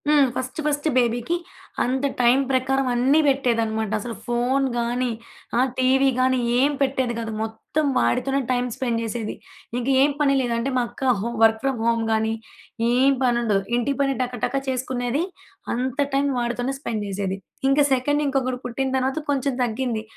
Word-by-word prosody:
హ్మ్. 295 Hz, -2 st, +5 dB
First 255 Hz, +3 st, -4 dB
first 295 Hz, +1 st, 0 dB
బేబీకి 240 Hz, +6 st, +1 dB, 0.5 s
అంత 260 Hz, +3 st, 0 dB, 0.2 s
టైం 240 Hz, +2 st, +5 dB
ప్రకారం 265 Hz, +1 st, +1 dB
అన్నీ 260 Hz, +5 st, +3 dB
పెట్టేదనమాట. 230 Hz, -5 st, +1 dB
అసలు 230 Hz, +2 st, -6 dB
ఫోన్ 245 Hz, +3 st, +1 dB
గాని, 240 Hz, +1 st, 0 dB, 0.5 s
ఆ -, -, +4 dB, 0.2 s
టీవీ 265 Hz, +1 st, +4 dB
గానీ 260 Hz, 0 st, +3 dB, 0.2 s
ఏం 280 Hz, +3 st, +4 dB
పెట్టేది 265 Hz, -3 st, +1 dB
కాదు. 225 Hz, -1 st, -4 dB
మొత్తం 225 Hz, +7 st, -2 dB
వాడితోనే 255 Hz, -, +1 dB
టైమ్ 250 Hz, 0 st, +1 dB
స్పెండ్ 240 Hz, -4 st, -1 dB
జేసేది. 225 Hz, -1 st, -3 dB, 0.4 s
ఇంక 245 Hz, -, -4 dB
ఏం 285 Hz, +2 st, +4 dB
పని 280 Hz, -2 st, +4 dB
లేదు 240 Hz, -2 st, -1 dB
అంటే 245 Hz, +4 st, -1 dB
మా -, -, +3 dB
అక్క 255 Hz, +2 st, 0 dB
హోమ్ 235 Hz, +3 st, -3 dB
వర్క్ 220 Hz, 0 st, +4 dB
ఫ్రమ్ 270 Hz, -3 st, 0 dB
హోమ్ 230 Hz, -1 st, +2 dB
గానీ, 220 Hz, 0 st, +1 dB, 0.6 s
ఏం 265 Hz, +3 st, +4 dB
పనుండదు. 235 Hz, -5 st, +2 dB, 0.2 s
ఇంటి 260 Hz, +4 st, 0 dB
పని 275 Hz, -1 st, +1 dB
టకటక 245 Hz, 0 st, -2 dB
చేసుకునేది, 255 Hz, +2 st, -1 dB, 0.5 s
అంత 255 Hz, +3 st, -2 dB, 0.2 s
టైం 280 Hz, +1 st, +2 dB
వాడితోనే 245 Hz, +2 st, -2 dB
స్పెండ్ 220 Hz, -7 st, -3 dB
జేసేది. 195 Hz, -1 st, -2 dB, 0.3 s
ఇంకా 280 Hz, +1 st, +4 dB
సెకండ్ 290 Hz, +3 st, +1 dB
ఇంకొకరు 260 Hz, -2 st, -1 dB
పుట్టిన 265 Hz, +2 st, -2 dB
తర్వాత 265 Hz, +2 st, -1 dB
కొంచెం 275 Hz, -1 st, +1 dB
తగ్గింది. 235 Hz, -1 st, -2 dB
250 Hz, 160 wpm, -23 LUFS, 235-270 Hz, 0.6 s, హ్మ్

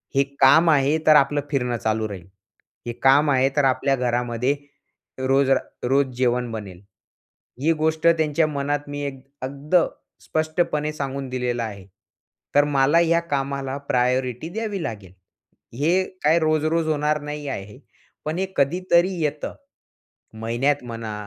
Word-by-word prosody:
"हे 140 Hz, -, +5 dB, 0.2 s
काम 160 Hz, +5 st, +6 dB
आहे 145 Hz, 0 st, +3 dB
तर 155 Hz, -, +8 dB
आपलं 145 Hz, 0 st, +4 dB
फिरणं 125 Hz, -3 st, 0 dB
चालू 110 Hz, 0 st, -1 dB
राहील. 95 Hz, -3 st, -9 dB, 0.6 s
हे 120 Hz, -, -2 dB
काम 145 Hz, +3 st, +5 dB
आहे, 135 Hz, 0 st, +3 dB
तर 145 Hz, -, +3 dB
आपल्या 135 Hz, +1 st, +2 dB
घरामध्ये 125 Hz, +1 st, 0 dB, 0.6 s
रोज 135 Hz, +1 st, +2 dB
रा -, -, +4 dB, 0.3 s
रोज 140 Hz, +1 st, +3 dB
जेवण 125 Hz, -1 st, 0 dB
बनेल." 100 Hz, -5 st, -7 dB, 0.8 s
ही 160 Hz, +3 st, +3 dB
गोष्ट 160 Hz, +1 st, -1 dB
त्यांच्या 160 Hz, -1 st, +3 dB
मनात 145 Hz, 0 st, -2 dB
मी 145 Hz, 0 st, -5 dB
एक 135 Hz, -2 st, -5 dB, 0.2 s
अगदी 140 Hz, +5 st, -3 dB, 0.5 s
स्पष्टपणे 155 Hz, -1 st, -1 dB
सांगून 140 Hz, -2 st, -4 dB
दिलेलं 125 Hz, -2 st, -2 dB
आहे. 100 Hz, -4 st, -7 dB, 0.7 s
तर 145 Hz, -, +6 dB
मला 140 Hz, +3 st, +3 dB
ह्या 170 Hz, 0 st, +3 dB
कामाला 135 Hz, 0 st, -2 dB
प्रायोरिटी 125 Hz, +3 st, 0 dB
द्यावी 210 Hz, -1 st, -4 dB
लागेल. 100 Hz, -, -6 dB, 0.7 s
हे 175 Hz, +6 st, +3 dB, 0.2 s
काय 160 Hz, +3 st, +4 dB
रोज, 155 Hz, -1 st, +1 dB
रोज 160 Hz, 0 st, +1 dB
होणार 150 Hz, 0 st, 0 dB
नाही 150 Hz, 0 st, -6 dB
आहे. 100 Hz, -4 st, -7 dB, 0.5 s
पण 155 Hz, +3 st, -2 dB
हे 190 Hz, -, +1 dB
कधीतरी 175 Hz, +5 st, +2 dB
येतं, 150 Hz, -1 st, -2 dB, 0.9 s
महिन्यात 125 Hz, +5 st, 0 dB
म्हणा. 115 Hz, -3 st, -6 dB
140 Hz, 140 wpm, -23 LUFS, 125-155 Hz, 0.9 s, तर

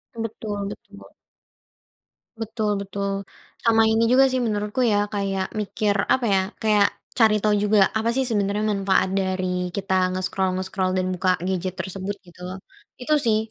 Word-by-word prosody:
Betul 210 Hz, -3 st, -4 dB
betul. -, -, -12 dB, 1.3 s
Betul 220 Hz, -1 st, -1 dB
betul. 200 Hz, 0 st, -3 dB, 0.5 s
Sama 225 Hz, -1 st, +5 dB
ini 225 Hz, +1 st, +3 dB
juga 265 Hz, +1 st, +6 dB
sih 260 Hz, -, +1 dB
menurutku 210 Hz, +3 st, -1 dB
ya 215 Hz, -3 st, +3 dB, 0.2 s
kayak 195 Hz, -2 st, -1 dB
mikir 205 Hz, 0 st, 0 dB, 0.2 s
apa 260 Hz, -, +1 dB
ya, 190 Hz, -, +4 dB, 0.2 s
kayak 210 Hz, -2 st, +4 dB, 0.3 s
cari 220 Hz, -3 st, +5 dB
tahu 210 Hz, 0 st, +2 dB
juga 205 Hz, -2 st, +4 dB
apa 220 Hz, +1 st, 0 dB
sih 265 Hz, +1 st, +2 dB
sebenarnya 205 Hz, -1 st, 0 dB
manfaat 195 Hz, -2 st, +2 dB
dari 185 Hz, -2 st, -1 dB
kita 195 Hz, -1 st, -2 dB, 0.2 s
nge-scroll-nge-scroll 185 Hz, 0 st, -1 dB
dan 185 Hz, 0 st, 0 dB
buka 185 Hz, +1 st, 0 dB
gadget 185 Hz, 0 st, -2 dB
tersebut 190 Hz, +1 st, -4 dB
gitu 175 Hz, 0 st, -18 dB
loh. 185 Hz, +1 st, -6 dB, 0.4 s
Itu 305 Hz, -, 0 dB
sih 220 Hz, -2 st, +3 dB
200 Hz, 145 wpm, -23 LUFS, 190-220 Hz, 1.3 s, juga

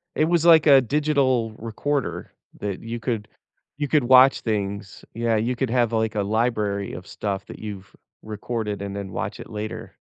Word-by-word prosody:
It 155 Hz, -, +3 dB
was 170 Hz, 0 st, +1 dB
like 165 Hz, -2 st, +7 dB
a 140 Hz, -3 st, +7 dB
digital 130 Hz, -4 st, +1 dB
recorder 135 Hz, +5 st, -3 dB, 0.3 s
that 100 Hz, -2 st, -4 dB
you 115 Hz, +1 st, -5 dB
could 110 Hz, -3 st, -3 dB, 0.5 s
you 145 Hz, -1 st, -1 dB
could 145 Hz, -1 st, +2 dB
watch 130 Hz, +2 st, +6 dB
things. 100 Hz, -2 st, -4 dB
Yeah, 115 Hz, -1 st, 0 dB
you 120 Hz, +4 st, 0 dB
could 130 Hz, 0 st, -1 dB
have, 120 Hz, -2 st, +2 dB
like, 110 Hz, -1 st, 0 dB
a 105 Hz, -, +1 dB
library 105 Hz, -2 st, -1 dB
of 90 Hz, -, -9 dB
stuff 100 Hz, -2 st, -4 dB
that -, -, -9 dB
you've 100 Hz, -2 st, -8 dB, 0.3 s
recorded 110 Hz, -1 st, -4 dB
and 100 Hz, 0 st, -5 dB
then 100 Hz, -1 st, -6 dB
watch -, -, -4 dB
it -, -, -9 dB
later. 105 Hz, 0 st, -6 dB
115 Hz, 180 wpm, -23 LUFS, 105-130 Hz, 0.5 s, like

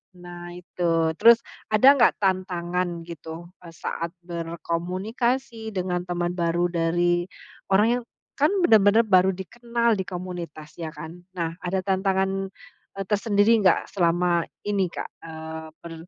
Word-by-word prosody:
Nah 175 Hz, 0 st, -9 dB
itu. 170 Hz, -2 st, 0 dB
Terus 235 Hz, 0 st, +7 dB, 0.2 s
ada 220 Hz, +6 st, +7 dB
nggak 270 Hz, -4 st, +4 dB
tantangan 180 Hz, -2 st, -1 dB
gitu, 165 Hz, +1 st, -9 dB
eee, 170 Hz, -, -10 dB
saat 170 Hz, +1 st, -4 dB
berkomunikasi 190 Hz, +8 st, -3 dB
dengan 180 Hz, -1 st, -2 dB
teman 175 Hz, 0 st, -1 dB
baru 170 Hz, +1 st, +1 dB
dari 175 Hz, +1 st, +1 dB, 0.4 s
orang 205 Hz, +3 st, +5 dB
yang 245 Hz, -, -11 dB, 0.3 s
kan 295 Hz, +4 st, +3 dB
benar-benar 220 Hz, -, +5 dB
baru 190 Hz, -1 st, +5 dB
dikenal 235 Hz, +4 st, -1 dB
di 190 Hz, -, 0 dB
komunitas 175 Hz, -4 st, -7 dB
ya 165 Hz, -, -3 dB
kan. 160 Hz, +3 st, -10 dB
Nah 165 Hz, -1 st, -2 dB
ada 185 Hz, +1 st, -1 dB
tantangan, 195 Hz, 0 st, 0 dB, 0.5 s
eee, 195 Hz, -, -2 dB
tersendiri 205 Hz, +2 st, +3 dB
enggak 190 Hz, -4 st, +3 dB
selama 175 Hz, -1 st, +2 dB, 0.2 s
ini, 195 Hz, -4 st, 0 dB
Kak, -, -, -5 dB, 0.2 s
eee, 160 Hz, 0 st, -7 dB, 0.2 s
ber 170 Hz, -, -8 dB
180 Hz, 130 wpm, -25 LUFS, 170-200 Hz, 0.5 s, Terus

